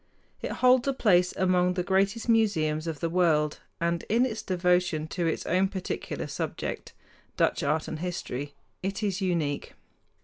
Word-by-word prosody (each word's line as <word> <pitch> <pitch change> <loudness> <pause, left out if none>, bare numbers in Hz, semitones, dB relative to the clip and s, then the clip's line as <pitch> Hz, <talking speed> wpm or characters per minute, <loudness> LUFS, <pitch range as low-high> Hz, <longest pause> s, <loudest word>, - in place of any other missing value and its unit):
It - - -3
holds 255 +1 +4
a 275 - +2
place 180 -8 +3
among 180 -1 +2
the 180 - 0
greatest 195 +5 +1
museums 170 -9 +2
of 160 -3 -4
the 165 - +1
world, 160 -4 +2 0.2
and 170 0 0
in 235 +4 +4
its 220 -4 -3
devotion 180 -4 +1
to 175 -3 -1
its 160 - -2
own 185 +3 +2
particular 190 -2 -4
subject - - -4 0.4
Dutch - - +2
art 150 +2 0
and 155 - -5
history 145 -6 -4 0.3
it 195 +3 -3
is 200 -1 -1
unique. 165 -6 -1
180 Hz, 160 wpm, -28 LUFS, 160-195 Hz, 0.4 s, holds